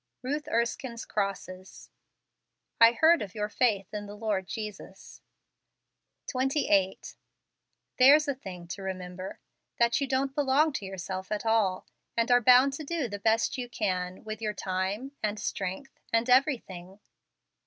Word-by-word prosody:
Ruth 290 +4 -3
Erskine's 235 +1 -2
Crosses. 195 -2 -5 0.9
"7 230 +1 +8
heard 330 +1 +6
of 200 -1 -6
your 210 0 -2
faith 210 -5 0
in 205 -1 -5
the 205 - -9
Lord 205 -4 -2
Jesus" 210 -3 -8 1.0
28. 255 -8 0 0.8
There's 290 +4 +7
a 280 - +1
thing 185 -9 -9
to 195 - -6
remember; 185 -1 -6 0.4
that 235 +3 +2
you 275 - 0
don't 265 +1 0
belong 290 +2 +2
to 210 - -4
yourself 190 0 -6
at 210 +1 -2
all; 215 -5 +1 0.3
and 230 +1 +2
are 245 0 +6
bound 255 +3 +6
to 305 - -5
do 310 -3 -2
the 205 -2 -6
best 225 +4 +1
you 245 -1 -5
can 185 -5 -2
with 220 0 -6
your 210 -1 -1
time, 190 +8 -3
and 210 0 -2
strength, 200 +5 -4
and 230 +1 +2
everything. 205 - +1
220 Hz, 145 wpm, -28 LUFS, 190-260 Hz, 1.0 s, 7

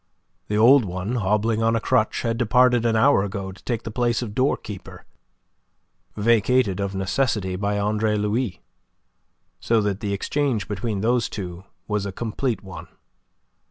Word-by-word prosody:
The 105 - -1
old 125 +4 +6
one, 95 +5 -3
hobbling 105 +2 +1
on 115 0 +2
a - - +2
crutch, 115 -1 +1
had 115 -1 -1
departed 125 0 +3
an 115 - +1
hour 135 0 +4
ago 100 -1 -4
to 95 - -16
take 115 -2 -3
the 110 - -6
place 120 +1 0
of 105 -4 -6
doorkeeper, 110 -6 -3 1.1
vacated 115 -1 +2
of 100 -1 -2
necessity 95 -1 -1
by 100 +2 -1
Andre 105 +1 0
Louis. 105 +1 -2 1.0
So 115 -1 +2
that 100 -1 -1
the 105 -2 -3
exchange 130 +2 -1
between 105 0 -3
those 120 +2 +1
two 90 -2 -7 0.2
was 105 -1 -1
a - - -4
complete 115 +3 -3
one. 95 -2 -9
110 Hz, 155 wpm, -23 LUFS, 100-120 Hz, 1.1 s, old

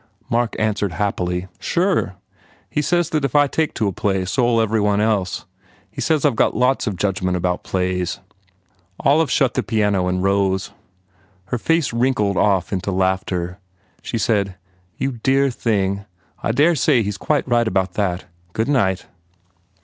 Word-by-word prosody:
Mark 120 0 +1
answered 105 -4 0
happily, 90 -1 -2
"Sure. 175 - 0 0.6
He 150 - +1
says 175 +1 +1
that 155 -2 0
if 140 -1 -1
I 145 0 +6
take 155 +2 -1
to 110 - 0
a - - 0
play 95 -1 -1
so 120 +6 +1
ll 115 - +3
every 110 -1 +1
one 105 0 +2
else. 105 -4 0 0.5
He - - -6
says 155 -3 +1
I 145 - +5
ve - - -8
got - - +2
lots 125 +1 +2
of 100 - -1
judgment 90 -1 0
about 90 0 -1
plays." 90 0 -1 0.8
Olive 145 +2 +3
shut 125 -1 +2
the - - 0
piano 105 -5 +1
and 90 0 -1
rose. 95 -1 +1 0.8
Her 120 - -1
face 165 0 +1
wrinkled 115 -5 +1
off 95 -2 +2
into 95 +1 -2
laughter. 95 -1 -1 0.4
She - - -3
said, 100 -3 0 0.4
"You 135 -3 -2
dear 135 +1 +3
thing! 100 -4 -1 0.4
I - - 0
dare 150 +8 +4
say 125 -5 +3
he 100 - -2
s 100 - -4
quite 150 +7 0
right 120 -2 +2
about 95 -2 0
that. 90 -3 -1 0.3
Good 110 +4 -1
night." 95 -10 +1
105 Hz, 170 wpm, -20 LUFS, 95-125 Hz, 0.8 s, I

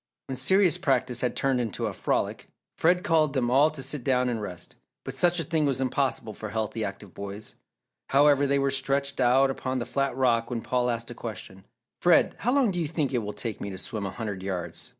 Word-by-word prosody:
When 135 - -5
serious 180 +6 +4
practice 130 -6 +1
had 125 - -1
turned 135 -2 +1
into 115 -5 -3
a - - -2
frolic, - - -1 0.3
Fred 180 +3 +2
called 160 -6 +2
them 125 -3 0
all 140 +4 +5
to 155 -4 -7
sit 140 0 -3
down 125 -1 +2
and 115 -3 -2
rest, 90 -5 -7 0.3
but - - -4
such 175 0 +2
a - - 0
thing 160 -3 +1
was 135 -2 0
impossible 130 -4 -1
for 110 +1 -6
healthy 110 +1 -2
active 100 -2 -6
boys. 100 +3 -8 0.6
However, 145 0 +4
they 140 0 +2
were 140 0 +1
stretched 140 +1 -1
out 130 +2 +4
upon 130 -1 -3
the 120 - -2
flat 135 +2 -1
rock 120 -3 +2
when 120 -2 -3
Paul 125 -1 0
asked 115 0 -3
a - - -5
question. 100 -4 -8 0.4
"Fred, 175 -1 +4
how 245 - +1
long 265 -5 +3
do 175 - -3
you 165 - -1
think 150 -3 -2
it 125 - +2
will 105 -2 -4
take 115 -4 -5
me 100 - -4
to 95 - -7
swim 100 +1 -4
a - - -3
hundred 100 -3 -5
yards? 95 -2 -5
130 Hz, 225 wpm, -27 LUFS, 115-140 Hz, 0.6 s, all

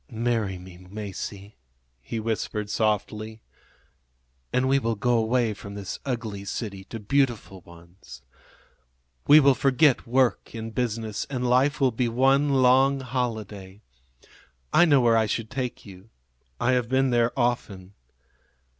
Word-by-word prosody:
"Marry 115 -5 -1
me, 90 -1 -13
Masie," 100 0 -7 0.5
he 115 - -5
whispered 105 -1 -3
softly, 110 +1 -1 1.1
"and 125 +1 +1
we 135 +1 +3
will 115 -3 -1
go 120 +4 +1
away 115 0 +1
from 100 0 -10
this 100 -2 -6
ugly 115 -6 -4
city 100 -1 -5
to 115 - -8
beautiful 115 -5 -1
ones. 85 -2 -15 1.0
We 150 +2 +9
will 140 -2 +5
forget 135 +1 +2
work 125 -1 +1
and 115 0 -6
business, 110 -2 -2
and 125 -3 -2
life 135 +4 +2
will 135 -2 +3
be 120 +2 -1
one 135 +4 +3
long 135 +2 +4
holiday. 110 -6 -5 0.9
I 175 - +6
know 145 -5 +4
where 115 -1 +4
I 110 -1 +2
should 110 0 -3
take 130 -2 -4
you 95 +1 -14 0.5
I 130 - +2
have 125 -2 0
been 130 0 +2
there 120 0 +2
often. 100 -6 -2
115 Hz, 135 wpm, -25 LUFS, 105-130 Hz, 1.1 s, We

